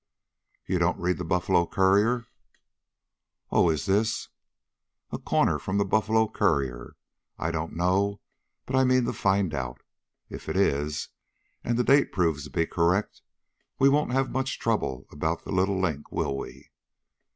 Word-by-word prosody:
"You -, -, 0 dB
don't -, -, +1 dB
read 90 Hz, +1 st, 0 dB
the -, -, -3 dB
Buffalo 90 Hz, 0 st, +1 dB
Courier?" 105 Hz, +6 st, +2 dB, 1.3 s
"Oh, 90 Hz, -, +4 dB
is 80 Hz, -4 st, -1 dB
this 110 Hz, +4 st, 0 dB, 0.4 s
" -, -, -52 dB
"A -, -, -4 dB
corner -, -, +1 dB
from 95 Hz, +1 st, -2 dB
the 100 Hz, -, +2 dB
Buffalo 110 Hz, +2 st, +2 dB
Courier? 65 Hz, -, -1 dB, 0.4 s
I 80 Hz, -, -2 dB
don't 80 Hz, 0 st, -4 dB
know, 95 Hz, +4 st, +1 dB, 0.5 s
but 130 Hz, -, -3 dB
I 130 Hz, -, +4 dB
mean 130 Hz, -1 st, +3 dB
to -, -, -2 dB
find 95 Hz, -3 st, +1 dB
out. 65 Hz, -3 st, -5 dB, 0.4 s
If -, -, -8 dB
it -, -, -2 dB
is, 75 Hz, +2 st, 0 dB, 0.5 s
and 120 Hz, -1 st, 0 dB
the 125 Hz, -, +2 dB
date 140 Hz, +3 st, +4 dB
proves 80 Hz, -6 st, 0 dB
to -, -, -10 dB
be 85 Hz, -, 0 dB
correct, 85 Hz, +5 st, 0 dB, 0.6 s
we 135 Hz, -, +5 dB
won't 145 Hz, -1 st, +2 dB
have 135 Hz, +1 st, 0 dB
much 130 Hz, 0 st, -2 dB
trouble 65 Hz, -, -1 dB
about 80 Hz, +3 st, -2 dB
the -, -, -7 dB
little 95 Hz, +1 st, +1 dB
link, 80 Hz, -6 st, -2 dB
will 70 Hz, -, -1 dB
we?" 70 Hz, -, -9 dB
95 Hz, 160 wpm, -26 LUFS, 80-110 Hz, 1.3 s, we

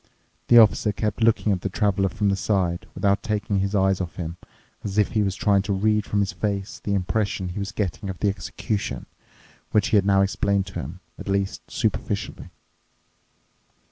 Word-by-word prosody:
The 120 Hz, -, +7 dB
Officer 110 Hz, -1 st, +6 dB
kept 105 Hz, +2 st, -2 dB
looking 110 Hz, -1 st, +3 dB
at 95 Hz, -2 st, 0 dB
the 100 Hz, -, -2 dB
Traveler 95 Hz, -1 st, +1 dB
from 100 Hz, +4 st, 0 dB
the 100 Hz, -, +2 dB
side, 95 Hz, -3 st, 0 dB
without 100 Hz, -1 st, +2 dB
taking 105 Hz, -1 st, -1 dB
his 100 Hz, +2 st, -1 dB
eyes 95 Hz, -1 st, +2 dB
off 85 Hz, -2 st, -5 dB
him, 85 Hz, -1 st, -5 dB, 0.5 s
as 100 Hz, 0 st, -4 dB
if 105 Hz, -, +4 dB
he 110 Hz, -, +1 dB
was 95 Hz, -2 st, 0 dB
trying 100 Hz, -1 st, +3 dB
to 100 Hz, 0 st, -2 dB
read 105 Hz, +1 st, +1 dB
from 100 Hz, -, +1 dB
his 100 Hz, -2 st, 0 dB
face 100 Hz, +1 st, -3 dB
the 100 Hz, -, 0 dB
impression 95 Hz, 0 st, -1 dB
he 90 Hz, -, -5 dB
was 100 Hz, 0 st, -3 dB
getting 100 Hz, 0 st, -3 dB
of 95 Hz, -, -5 dB
the 100 Hz, -, 0 dB
execution, 100 Hz, -, -3 dB, 0.6 s
which 105 Hz, -2 st, +2 dB
he 110 Hz, -, +4 dB
had 100 Hz, -, +3 dB
now 100 Hz, -1 st, +5 dB
explained 100 Hz, 0 st, +1 dB
to 95 Hz, -, -11 dB
him, 80 Hz, +8 st, -7 dB, 0.2 s
at -, -, -8 dB
least 100 Hz, 0 st, -2 dB
superficially. -, -, -2 dB
100 Hz, 190 wpm, -24 LUFS, 95-105 Hz, 0.6 s, The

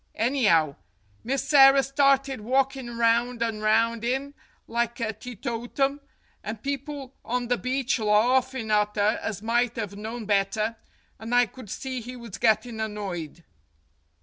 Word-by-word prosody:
Any'ow, 210 Hz, -, +2 dB, 0.5 s
Misserrer 270 Hz, +1 st, +5 dB
started 275 Hz, -2 st, +2 dB
walkin' 260 Hz, 0 st, 0 dB
round 235 Hz, +1 st, +2 dB
an' 225 Hz, -2 st, -2 dB
round 225 Hz, +1 st, +2 dB
'im, 270 Hz, +4 st, -1 dB, 0.3 s
like 235 Hz, +1 st, -2 dB
a 225 Hz, -1 st, -1 dB
teetotum, 245 Hz, +4 st, -3 dB, 0.4 s
and 215 Hz, +1 st, -6 dB
people 280 Hz, -1 st, -5 dB
on 245 Hz, 0 st, -2 dB
the 245 Hz, -, +2 dB
beach 255 Hz, 0 st, 0 dB
larfin' 235 Hz, +2 st, +2 dB
at 210 Hz, 0 st, +2 dB
'er 205 Hz, +2 st, +2 dB
as 210 Hz, -2 st, -4 dB
might 240 Hz, +1 st, +1 dB
have 210 Hz, -4 st, -4 dB
known 220 Hz, +2 st, -6 dB
better, 210 Hz, +2 st, 0 dB, 0.4 s
and 230 Hz, +2 st, -2 dB
I 245 Hz, 0 st, +6 dB
could 240 Hz, 0 st, -12 dB
see 260 Hz, +2 st, -4 dB
he 250 Hz, +3 st, -8 dB
was 235 Hz, -5 st, -9 dB
gettin' 220 Hz, +1 st, +1 dB
annoyed." 195 Hz, -7 st, -5 dB
235 Hz, 135 wpm, -26 LUFS, 215-260 Hz, 0.5 s, I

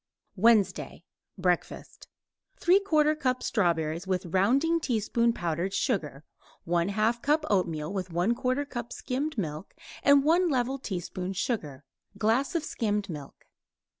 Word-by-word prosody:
WEDNESDAY 215 Hz, 0 st, +2 dB, 0.3 s
BREAKFAST 180 Hz, -2 st, -2 dB, 0.5 s
3/4 315 Hz, -5 st, +3 dB
cup 255 Hz, -2 st, 0 dB
strawberries 170 Hz, -4 st, 0 dB
with 185 Hz, -1 st, -1 dB
rounding 255 Hz, -, +2 dB
teaspoon 235 Hz, -3 st, +1 dB
powdered 175 Hz, -1 st, -2 dB
sugar; 150 Hz, -, -1 dB, 0.4 s
1/2 200 Hz, +7 st, +1 dB
cup 300 Hz, +3 st, +1 dB
oatmeal 165 Hz, -4 st, 0 dB
with 185 Hz, -2 st, -3 dB
1/4 240 Hz, +10 st, 0 dB
cup 240 Hz, -3 st, -6 dB
skimmed 275 Hz, +3 st, -3 dB
milk 155 Hz, -2 st, -4 dB, 0.3 s
and 280 Hz, -1 st, +5 dB
1 340 Hz, +4 st, +3 dB
level 265 Hz, -1 st, 0 dB
teaspoon 185 Hz, -3 st, -4 dB
sugar; 160 Hz, -, -3 dB, 0.3 s
glass 230 Hz, -, +1 dB
of 330 Hz, -, 0 dB
skimmed 210 Hz, -, -2 dB
milk. 145 Hz, -3 st, -10 dB
215 Hz, 115 wpm, -28 LUFS, 180-265 Hz, 0.5 s, and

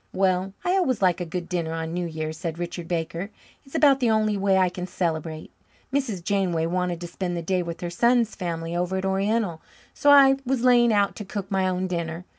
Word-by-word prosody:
"Well, 190 Hz, 0 st, +1 dB
I 355 Hz, -, +2 dB
always 260 Hz, -, +1 dB
like 180 Hz, -1 st, +3 dB
a -, -, -2 dB
good 175 Hz, 0 st, -4 dB
dinner 170 Hz, -3 st, -2 dB
on 165 Hz, 0 st, -4 dB
New 175 Hz, 0 st, -2 dB
Year's," 155 Hz, -1 st, -4 dB
said 165 Hz, -1 st, -5 dB
Richard 175 Hz, 0 st, -5 dB
Baker. 170 Hz, +2 st, -3 dB, 0.3 s
"It's 270 Hz, +1 st, -14 dB
about 285 Hz, -4 st, +5 dB
the 245 Hz, -3 st, +2 dB
only 215 Hz, -1 st, +2 dB
way 195 Hz, -1 st, +2 dB
I 185 Hz, -1 st, +4 dB
can 180 Hz, 0 st, -5 dB
celebrate. 160 Hz, -3 st, -3 dB, 0.4 s
Mrs. 235 Hz, -11 st, -1 dB
Janeway 180 Hz, -4 st, 0 dB
wanted 180 Hz, 0 st, -1 dB
to 175 Hz, -, -5 dB
spend 175 Hz, 0 st, -4 dB
the 170 Hz, -, -4 dB
day 185 Hz, +2 st, 0 dB
with 170 Hz, -1 st, -6 dB
her 175 Hz, -1 st, -4 dB
son's 235 Hz, +4 st, +2 dB
family 170 Hz, -2 st, -4 dB
over 180 Hz, +2 st, -1 dB
at 190 Hz, -, -2 dB
Oriental, 195 Hz, -2 st, 0 dB, 0.3 s
so 290 Hz, -, +2 dB
I 275 Hz, -1 st, +7 dB
was 255 Hz, -1 st, -1 dB
laying 240 Hz, -2 st, +5 dB
out 205 Hz, -2 st, +2 dB
to 215 Hz, -, -5 dB
cook 200 Hz, -1 st, -6 dB
my 190 Hz, -1 st, +1 dB
own 185 Hz, 0 st, -1 dB
dinner. 170 Hz, -1 st, -4 dB
185 Hz, 220 wpm, -25 LUFS, 170-210 Hz, 0.4 s, I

